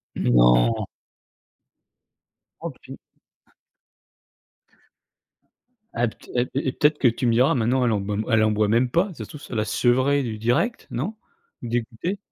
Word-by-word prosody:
Non? - - +3 1.7
Oh - - -5
pu - - -13 3.0
Ah 120 +1 +1
pte 110 - -12
et 125 0 +1 0.2
et - - -2
peut-être 150 +3 +1
que 125 - +5
tu 120 +2 -2
me 115 - +3
diras 125 +4 +4
maintenant, 125 +1 +1
elle 120 - +2
en 105 -2 0 0.3
elle 110 -1 +4
en 110 - +2
boit 105 0 +1
même 120 +3 +2
pas, 175 +9 +1
si - - -12
ça - - -6
se - - -18
trouve 150 - -10
ça 125 - -8
l'a 110 -1 0
sevré 130 +5 +2
du 110 -3 -4
direct, 130 - 0
non? 175 - -4 0.5
Dégoutée? 120 - -3
120 Hz, 150 wpm, -23 LUFS, 110-135 Hz, 3.0 s, que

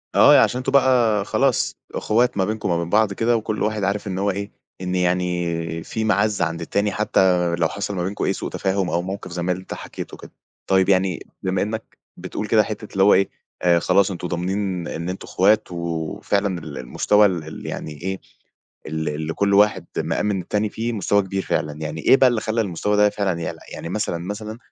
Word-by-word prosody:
آه، - - +8
ي - - +8
عشان - - +3
أنتم 130 +1 -2
بقى 125 -7 +4
خلاص 135 +3 +1 0.2
إخوات 120 +1 +1
ما 95 - +2
بينكم 110 -1 -2
وما 85 -1 +1
بين 85 - -4
بعض 105 +1 +3
كده 115 +4 +2
وكل 110 -1 -2
واحد 105 -1 -1
عارف 100 +1 -1
إن 95 -1 -3
هو 100 +1 +1
إيه، 100 +1 -5 0.3
إن 90 0 -2
يعني 90 -2 -1
في 110 - -3
معزّة 105 -3 +2
عند 85 +1 -4
التاني، 100 +1 0
حتى 90 -4 +2
لو 85 -1 +2
حصل 100 +3 -4
ما 90 - -1
بينكم 95 +3 -3
أي - - +1
سوء - - -5
تفاهم 95 -1 -1
أو 85 - 0
موقف 95 0 -6
زي 90 0 -4
ما 90 +1 0
أنت 95 +1 -5
حَكيته - - -8
كده. - - -13 0.4
طيب 95 0 +3
يعني 95 -2 +1 0.2
بما 95 0 0
إنّك 110 +2 -4 0.2
بتقول 105 - -5
كده 110 -1 +4
حتّة 105 0 -6
اللي 95 - +2
هو 100 - +7
إيه 95 - +3 0.3
آآ 85 -1 +4
خلاص 100 +3 +3
أنتم 90 0 -4
ضامنين 90 0 -2
إن 85 +2 -4
أنتم 95 - -6
إخوات 105 0 +2
و - - -6
وفعلًا 85 +3 -1
ال 75 -3 -8
المستوى 105 +11 +3
ال 90 -5 0
ال 80 - -9
يعني 80 - -5
إيه، 95 +1 -3 0.7
ال 80 0 -2
ال 80 +2 -4
كل 100 0 +1
واحد 105 +1 +4
مأمِن 105 -2 0
التاني 105 +4 -1
فيه 115 +3 -3
مستوى 100 -1 +2
كبير 95 0 -3
فعلًا. 75 -1 -1
يعني 80 +1 -4
إيه 135 - +6
بقى 130 - +6
اللي 120 -3 -1
خلّى 110 +1 0
المستوى 105 +2 -1
ده 105 0 +5
فعلًا 100 -4 -1
يعلى؟ 80 - -4
يعني 85 - -6
مثلًا، 95 -2 -1
مثلًا 105 +5 -6
95 Hz, 210 wpm, -22 LUFS, 90-105 Hz, 0.7 s, آه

